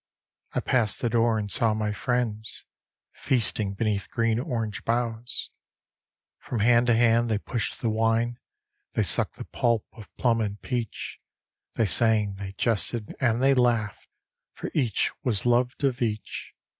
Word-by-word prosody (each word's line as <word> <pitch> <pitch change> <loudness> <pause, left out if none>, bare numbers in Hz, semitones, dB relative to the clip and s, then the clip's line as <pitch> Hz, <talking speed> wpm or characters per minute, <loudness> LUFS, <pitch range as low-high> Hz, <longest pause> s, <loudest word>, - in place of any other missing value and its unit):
I - - 0
passed 115 -5 +1
the 120 - +1
door, 115 -1 +3
and 100 -2 -2
saw 115 -2 +3
my 110 -1 -1
friends 110 -1 -2 0.5
Feasting 105 -5 0
beneath 105 -2 -1
green 115 -1 +1
orange 115 -7 -3
boughs; 115 0 0 0.9
From 120 -4 -3
hand 120 +2 +4
to 120 - +4
hand 115 0 +3
they 110 - +1
pushed 115 +2 -3
the 115 - +2
wine. 115 +2 +1 0.5
They - - +1
sucked - - +1
the - - -8
pulp 115 -3 0
of 110 -4 -13
plum 115 -2 +2
and 105 -1 -3
peach; 120 -4 -4 0.6
They 115 - +2
sang, 105 -1 +3
they 95 -1 -6
jested, 110 +1 -1
and 120 -1 +1
they 135 0 +5
laughed, 120 -6 +1 0.5
For - - -6
each 125 -9 +1
was 115 -5 +1
loved 125 +3 +1
of 130 -3 +1
each. 110 -3 -3
115 Hz, 150 wpm, -26 LUFS, 110-120 Hz, 0.9 s, they